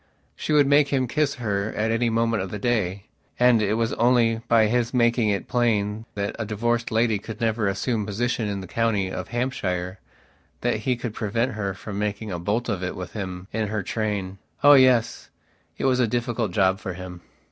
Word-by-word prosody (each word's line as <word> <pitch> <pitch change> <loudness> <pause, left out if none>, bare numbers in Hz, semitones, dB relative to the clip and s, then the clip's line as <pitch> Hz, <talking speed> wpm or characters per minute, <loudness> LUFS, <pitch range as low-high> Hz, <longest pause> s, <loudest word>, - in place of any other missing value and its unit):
She - - -4
would 150 -1 +5
make 145 +1 +4
him 130 -2 0
kiss 145 +2 0
her 105 -4 -2
at 110 +1 +1
any 115 +1 +1
moment 115 -1 +1
of 95 - -4
the 105 - -5
day; 100 -3 -1 0.3
and 125 -2 +5
it 105 0 +1
was 115 0 0
only 115 -1 +3
by 115 -2 +5
his 120 +2 0
making 120 -2 +3
it 100 -1 -1
plain 110 -3 0
that 100 0 -2
a - - 0
divorced 115 +3 -1
lady 110 -2 +2
could 110 +1 -8
never 110 -2 0
assume 105 +4 -1
a - - -3
position 115 +2 -1
in 100 -1 -3
the 95 - -8
county 105 -3 0
of - - -5
Hampshire 95 -7 -2 0.6
that 120 -2 +1
he 125 +4 0
could 120 -2 -5
prevent 115 +4 -1
her 100 -3 -3
from 100 0 -6
making 105 0 -3
a 90 - -3
bolt 105 +7 -1
of 100 -5 -2
it 90 - -3
with 90 -1 -7
him 95 -3 -5
in 110 -1 -1
her 105 -1 -2
train. 100 -2 -3 0.2
Oh, 145 0 +9
yes, 130 -4 +4 0.5
it - - -2
was 130 -1 +3
a 125 - +3
difficult 120 -2 -1
job 95 0 +2
for 95 - -5
him. 90 -1 -9
110 Hz, 205 wpm, -24 LUFS, 100-120 Hz, 0.6 s, Oh